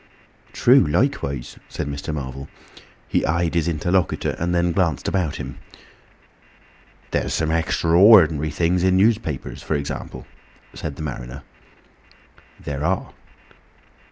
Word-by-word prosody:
"True - - +5
likewise," 70 -3 -1
said - - -4
Mr. 70 +2 -5
Marvel. 70 -2 -6 0.6
He - - 0
eyed 85 +1 0
his 85 -1 +1
interlocutor, 85 +3 0
and 85 +1 -1
then 85 0 +2
glanced 85 -5 0
about 90 -5 0
him. - - -7 1.5
"There's - - -1
some 80 -1 0
extra 80 0 0
ordinary 85 -5 +6
things 85 +3 0
in 95 0 +3
newspapers, 90 - 0
for 80 - -2
example," 70 -1 -5 0.5
said 75 -3 -6
the 80 - -7
mariner. 70 -1 -6 1.2
"There 70 0 -5
are." 90 +3 -1
80 Hz, 120 wpm, -22 LUFS, 70-85 Hz, 1.5 s, ordinary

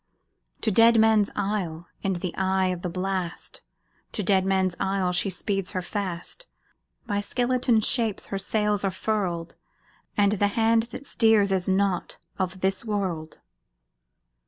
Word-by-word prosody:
To 220 - +2
Deadman's 220 -1 +5
Isle, 195 -5 -2 0.2
in 195 - 0
the 175 -1 -4
eye 190 0 +1
of 180 -1 -3
the 180 - -3
blast, 185 -1 -2 0.5
To 210 - -2
Deadman's 190 -1 +2
Isle, 190 -2 0
she 180 +3 +1
speeds 195 +1 -2
her 185 - -1
fast; 200 - -4 0.6
By 205 -3 -1
skeleton 245 +1 +1
shapes 225 -2 0
her 195 - -1
sails 210 0 0
are 195 - +2
furled, 185 -4 -2 0.6
And 200 -1 +4
the 205 -1 +2
hand 225 0 +3
that 270 - -8
steers 220 -6 +3
is 190 -1 +1
not 190 -1 0 0.2
of 185 0 -2
this 190 +2 0
world! 190 -8 -3
195 Hz, 135 wpm, -26 LUFS, 185-215 Hz, 0.6 s, Deadman's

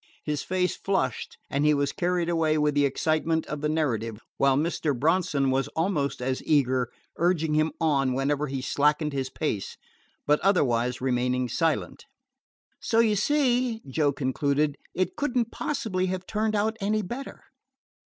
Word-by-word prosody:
His 150 -2 -1
face 185 0 0
flushed 160 - -2
and 140 +1 -1
he 150 0 +4
was 140 -1 0
carried 175 -1 0
away 160 -2 +2
with 150 -1 +2
the 145 0 +3
excitement 160 +3 0
of 150 -1 -5
the 150 - 0
narrative, 115 -9 -1 0.2
while 135 -1 +3
Mr. 150 -3 -1
Bronson 150 -3 +2
was 135 +1 +1
almost 160 -7 -1
as 130 0 -1
eager, 130 -5 +2 0.3
urging 165 -3 +1
him 155 +1 +2
on 140 -5 +2
whenever 145 +2 0
he 135 -1 -4
slackened 150 +2 +1
his 135 -1 -2
pace, 120 -10 -3 0.5
but 150 +1 +3
otherwise 125 - +1
remaining 125 0 0
silent. 160 +7 -1 0.7
"So 225 - -1
you 225 -2 +4
see," 250 -1 +1
Joe 145 +2 +1
concluded, 140 +2 0 0.2
"it 185 -1 -1
could 275 -3 -1
n't 235 -2 +1
possibly 215 -11 -2
have 185 0 -3
turned 215 0 -1
out 220 +2 0
any 210 +2 0
better." 240 +8 -7
150 Hz, 155 wpm, -26 LUFS, 135-185 Hz, 0.7 s, he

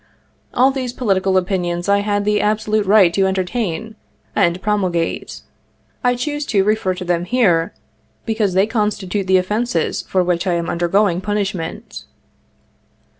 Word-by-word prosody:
All 260 +2 +3
these 255 -3 -4
political 195 -6 +1
opinions 175 -1 -1
I 200 0 +3
had 205 0 -1
the 210 0 +2
absolute 215 -1 0
right 195 -4 +5
to 195 +1 +2
entertain 190 +2 -2 0.4
and 170 +1 +2
pro 210 +2 0
mulgate. 175 -4 -2 0.6
I 245 0 +3
choose 295 +4 -3
to 200 -4 +2
refer 205 -3 0
to 180 - -6
them 175 0 0
here, 180 -8 +1 0.5
because 215 -4 0
they 190 +1 +4
constitute 210 -3 -2
the 190 0 +5
offences 195 -1 -1
for 185 -1 0
which 175 +1 -1
I 175 - +2
am 170 -1 -2
undergoing 175 +1 +1
punishment. 195 -4 -4
195 Hz, 145 wpm, -19 LUFS, 180-215 Hz, 0.6 s, right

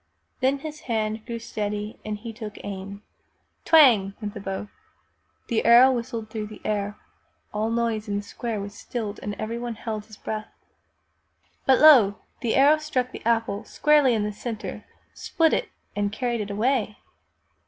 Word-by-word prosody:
Then 265 +2 +2
his 305 +2 -7
hand 220 -1 -1
grew 235 - -3
steady 210 -2 -4
and 215 -1 -4
he 225 +2 -8
took 215 -2 -8
aim. 200 +1 -7 0.6
Twang! 230 -12 +6
went 210 -2 -5
the - - -7
bow. 195 +1 -4 0.8
The 230 - 0
arrow 240 +3 +8
whistled 230 -3 -4
through 215 -1 -4
the 215 0 -11
air. 205 -1 -1 0.6
All 215 +1 0
noise 230 -2 -1
in 200 -1 -1
the 205 - -3
square 225 +1 -4
was 200 +1 -6
stilled 215 0 -5
and 205 0 -4
everyone 230 +3 -4
held 215 -1 -5
his 215 -1 -14
breath. 215 0 -5 1.2
But 265 -1 +6
lo! 250 -10 +8 0.2
the 235 -3 0
arrow 290 +3 +6
struck 260 -5 -1
the - - -8
apple 225 -3 +1
squarely 295 -5 +3
in 215 - 0
the 210 0 -2
center, 220 +1 -6 0.3
split 325 -1 +1
it, - - 0 0.3
and 205 0 0
carried 235 0 -1
it 205 - -5
away! 215 0 0
220 Hz, 165 wpm, -25 LUFS, 210-245 Hz, 1.2 s, arrow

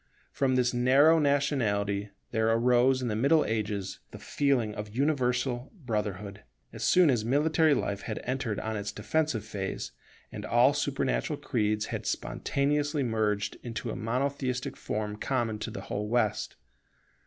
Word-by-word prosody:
From 130 -2 +1
this 125 -1 +2
narrow 135 +7 +5
nationality 110 -9 +1 0.2
there 110 0 +1
arose 125 +3 +3
in - - -1
the 110 - -1
Middle 140 +8 +3
Ages 105 -3 -2
the - - -10
feeling 130 -7 0
of 105 +1 -7
universal 125 -2 0
brotherhood, 105 - -4 0.3
as - - -6
soon 180 -5 +5
as 120 -4 0
military 150 +5 +3
life 100 -5 -2
had 110 - -4
entered 125 -4 -2
on 110 0 -3
its 105 -1 -3
defensive 125 -1 -1
phase, 100 -3 -4 0.4
and - - -7
all - - +4
supernatural - - -1
creeds 105 0 0
had - - -4
spontaneously 145 +1 0
merged 110 -3 -1
into 115 -1 -5
a - - -5
monotheistic 130 +2 -2
form 105 -1 -4
common 115 -3 -1
to 110 - -4
the 110 - -6
whole 105 +1 -4
West. 110 -2 0
120 Hz, 145 wpm, -29 LUFS, 105-140 Hz, 0.4 s, narrow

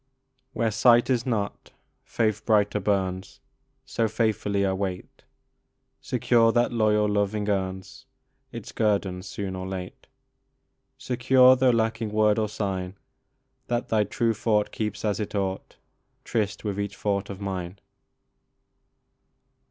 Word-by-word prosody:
Where 115 -1 0
sight 120 +4 +4
is 120 0 0
not, 105 -5 -3 0.3
faith 110 -2 -1
brighter 105 -2 +2
burns; 95 -2 -2 0.5
So 115 - 0
faithfully 105 -2 0
I 95 - +1
wait, 95 -1 -5 0.8
Secure 115 -2 +3
that 120 0 +2
loyal 105 -2 +2
loving 105 0 0
earns 100 +6 -3 0.4
Its 115 -3 -8
guerdon 100 -4 0
soon 95 0 -5
or 95 0 -5
late, 95 -1 -7 0.9
Secure, 130 +1 +5
though 130 0 +3
lacking 115 -1 0
word 105 0 +2
or 105 -1 0
sign, 95 -3 -3 0.7
That 120 0 -2
thy 110 -1 +3
true 115 +3 0
thought 105 -1 0
keeps 105 0 -4
as 105 0 0
it 105 0 -4
ought 95 -1 -3 0.5
Tryst 105 -4 -2
with 100 -2 -3
each 100 0 -4
thought 100 -1 -1
of 100 -1 -7
mine. 95 -2 -5
105 Hz, 125 wpm, -26 LUFS, 100-115 Hz, 0.9 s, Secure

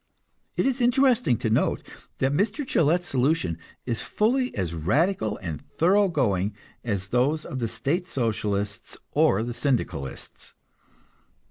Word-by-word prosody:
It - - +2
is 265 -1 0
interesting 250 - +3
to 110 - -1
note - - +1 0.3
that 135 +1 +1
Mr. 210 - 0
Gillette's 175 - +2
solution 130 - 0 0.3
is 115 -3 -2
fully 250 +4 +1
as 90 -4 -2
radical 110 - +1
and 80 -4 -4
thorough 175 +8 +2
going 100 - 0 0.3
as 100 -4 -2
those 140 +6 +1
of 130 - -5
the 115 - 0
State 170 - -2
Socialists 105 - -2
or 100 +3 +3
the 120 +1 -4
Syndicalists. 115 - -3
130 Hz, 130 wpm, -25 LUFS, -, 0.3 s, interesting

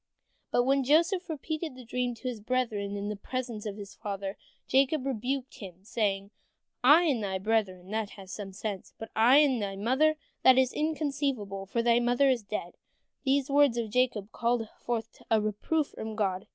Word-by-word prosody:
" - - -45
But 245 - +3
when 270 +2 +2
Joseph 340 +7 +3
repeated 315 0 -4
his 255 - -10
dream 245 +1 -2
to 255 - -7
his 240 -4 -4
brethren, 215 -4 -1
in 200 0 -3
the 210 - -2
presence 235 0 -4
of 205 0 -5
his 200 -1 -9
father, 195 -1 -5 0.3
Jacob 270 +1 +2
rebuked 260 +1 -2
him, 190 -6 -10
saying, 200 -2 -1 0.5
"I 300 +7 +8
and 270 -10 +1
thy 190 -1 -1
brethren, 190 -3 -1
that 220 -1 -1
has 190 -2 -10
some 195 +1 -6
sense, 195 0 -6
but 225 - -8
I 240 +5 +6
and 275 -6 +4
thy 195 -1 -3
mother, 260 +10 +2 0.3
that 260 0 +7
is 260 -1 +3
inconceivable, 275 -10 -2
for 230 +4 0
thy 235 0 +4
mother 245 +3 +3
is 250 -3 0
dead." 200 -4 -5 0.5
These 275 0 +2
words 285 -4 +4
of 225 -3 -2
Jacob 230 -4 +1
called 235 -1 0
forth 230 -2 -4
a 225 - +4
reproof 215 +9 -1
from 220 0 -6
God. 195 -3 -1
235 Hz, 185 wpm, -29 LUFS, 205-265 Hz, 0.5 s, I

